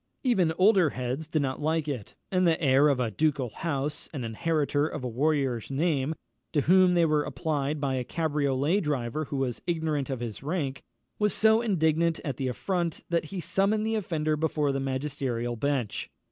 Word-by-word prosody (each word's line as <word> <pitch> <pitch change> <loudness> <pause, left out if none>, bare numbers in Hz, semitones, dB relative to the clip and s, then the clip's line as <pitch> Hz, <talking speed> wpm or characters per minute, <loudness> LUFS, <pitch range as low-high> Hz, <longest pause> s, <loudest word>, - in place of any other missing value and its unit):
Even 195 - +3
older 190 -4 +5
heads 130 +4 -4
did 155 -2 0
not 130 +1 -3
like 155 0 0
it; 125 -8 -5 0.2
and 185 -1 +3
the 165 -1 +2
heir 140 -2 +4
of 140 -3 +1
a 120 -3 0
ducal 140 -1 0
house, 145 -1 -3
and 135 -6 -4
inheritor 145 +4 0
of 130 - -6
a - - -1
warrior's 135 -2 0
name, 145 0 0 0.4
to 150 - +3
whom 185 +3 +5
they 170 -1 +4
were 155 -2 +2
applied 150 -1 -2
by 140 -2 -1
a 130 -1 -1
cabriolet 145 +3 0
driver 150 - -2
who 140 - -4
was 130 -3 -2
ignorant 160 -5 -1
of 130 -3 -2
his 115 -3 -5
rank, 145 -3 -2 0.4
was 210 -1 +2
so 220 +1 +4
indignant 165 -6 +1
at 140 -5 -3
the 135 - -1
affront, 170 +6 -2
that 170 -2 +1
he 185 +4 -6
summoned 195 +5 +1
the 225 - 0
offender 160 -7 0
before 150 -2 0
the 135 - -1
magisterial 130 -3 -2
bench. 130 -2 -2
150 Hz, 185 wpm, -28 LUFS, 135-170 Hz, 0.4 s, older